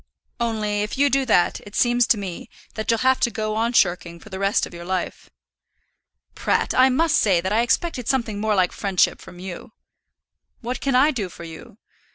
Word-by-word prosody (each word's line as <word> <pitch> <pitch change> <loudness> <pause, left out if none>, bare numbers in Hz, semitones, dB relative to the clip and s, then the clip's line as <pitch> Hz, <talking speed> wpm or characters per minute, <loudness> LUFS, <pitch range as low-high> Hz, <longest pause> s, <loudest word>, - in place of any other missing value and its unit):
Only 215 -3 -1
if 210 +4 -4
you 285 0 +3
do 270 0 +1
that 180 -6 +2
it 205 - -13
seems 240 0 +3
to 225 - +3
me 190 -4 -7 0.2
that 220 -2 -5
you'll 230 -1 +2
have 260 0 +4
to - - +2
go 215 -2 -3
on 225 +2 0
shirking 175 -6 +1
for 215 - -14
the 190 -1 -7
rest 195 +1 +1
of - - -13
your 170 0 -8
life." 185 0 -4 1.0
"Pratt, - - 0
I 260 +1 +5
must 315 +4 +2
say 190 -5 +3
that 190 +4 -2
I 225 - +3
expected 250 +1 -1
something 230 -6 -1
more 215 -1 +1
like 185 -2 +2
friendship 195 -3 0
from 175 - -13
you." 190 +5 -9 0.9
"What 245 +1 -4
can 275 -2 0
I 280 +5 +5
do 210 -9 -4
for 170 - -11
you? 165 +4 -11
215 Hz, 205 wpm, -22 LUFS, 190-245 Hz, 1.0 s, I